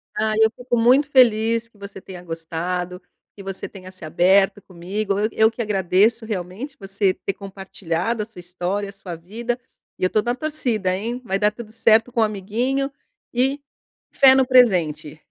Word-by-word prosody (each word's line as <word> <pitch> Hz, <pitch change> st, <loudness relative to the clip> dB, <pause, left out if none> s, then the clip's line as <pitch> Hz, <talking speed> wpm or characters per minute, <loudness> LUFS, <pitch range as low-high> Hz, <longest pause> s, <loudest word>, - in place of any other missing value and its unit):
Ah, 215 Hz, 0 st, 0 dB
eu 220 Hz, 0 st, +6 dB
fico 245 Hz, -1 st, -2 dB
muito 260 Hz, +6 st, +4 dB
feliz 230 Hz, -3 st, +4 dB
que 225 Hz, -, -27 dB
você 200 Hz, -1 st, -10 dB
tenha 180 Hz, -1 st, -10 dB
gostado, 175 Hz, +2 st, -4 dB, 0.3 s
que 200 Hz, -, -11 dB
você 195 Hz, 0 st, -5 dB
tenha 185 Hz, -2 st, -11 dB
se 185 Hz, -2 st, -10 dB
aberto 190 Hz, +5 st, +3 dB
comigo. 195 Hz, +3 st, -3 dB
Eu 215 Hz, +1 st, +1 dB
eu 220 Hz, +1 st, +3 dB
que 235 Hz, -, -5 dB
agradeço, 205 Hz, +3 st, +2 dB
realmente 210 Hz, +7 st, -5 dB
você 195 Hz, -1 st, 0 dB
ter 195 Hz, -, -4 dB
compartilhado 195 Hz, +1 st, -4 dB
a -, -, -7 dB
sua 220 Hz, -4 st, -14 dB
história, 180 Hz, +3 st, -3 dB
a -, -, -11 dB
sua 190 Hz, -3 st, -8 dB
vida 230 Hz, +9 st, -4 dB, 0.4 s
e -, -, -5 dB
eu 185 Hz, -, +3 dB
tô 215 Hz, -, +2 dB
na 240 Hz, +2 st, -1 dB
torcida, 245 Hz, -11 st, -1 dB
hein. 235 Hz, +5 st, -4 dB
Vai 195 Hz, -3 st, -1 dB
dar 210 Hz, 0 st, +3 dB
tudo 215 Hz, 0 st, -10 dB
certo 225 Hz, +1 st, +3 dB
com 235 Hz, -2 st, +1 dB
o -, -, +6 dB
amiguinho 230 Hz, +7 st, -1 dB, 0.4 s
e 270 Hz, +4 st, +1 dB, 0.5 s
fé 265 Hz, -1 st, +7 dB
no 265 Hz, -1 st, +4 dB
presente! 175 Hz, -, +3 dB
210 Hz, 180 wpm, -22 LUFS, 185-235 Hz, 0.5 s, fé